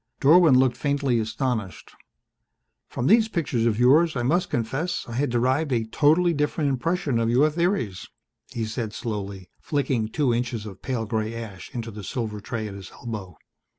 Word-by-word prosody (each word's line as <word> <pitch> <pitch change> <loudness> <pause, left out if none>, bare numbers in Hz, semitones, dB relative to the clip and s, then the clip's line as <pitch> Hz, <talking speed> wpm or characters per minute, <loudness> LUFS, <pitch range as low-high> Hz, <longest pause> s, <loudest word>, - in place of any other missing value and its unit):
Dorwin 155 -1 +6
looked 130 -1 +3
faintly 140 -4 +1
astonished. 110 -2 -3 1.0
"From 120 - -3
these 220 - +5
pictures 140 - 0
of 110 -2 +1
yours 150 +6 +5
I 120 - -1
must 175 +9 +1
confess 135 +10 -2
I 120 - -7
had 135 +4 0
derived 130 +5 +1
a 115 -3 +1
totally 155 +9 +3
different 150 -1 0
impression 145 -1 0
of 115 0 +1
your 140 +6 +4
theories," 160 - -1 0.4
he 115 -2 -3
said 110 -1 -4
slowly, 100 -5 -5
flicking 135 -6 -1
two 130 +2 +1
inches 120 -2 -2
of 100 -3 -10
pale 125 -4 -2
grey 110 +1 -2
ash 105 -6 -8
into 115 -2 -5
the 105 -1 -9
silver 110 0 -4
tray 110 0 -4
at 100 - -7
his 100 -1 -9
elbow. 105 -8 -7
120 Hz, 170 wpm, -25 LUFS, 110-145 Hz, 1.0 s, Dorwin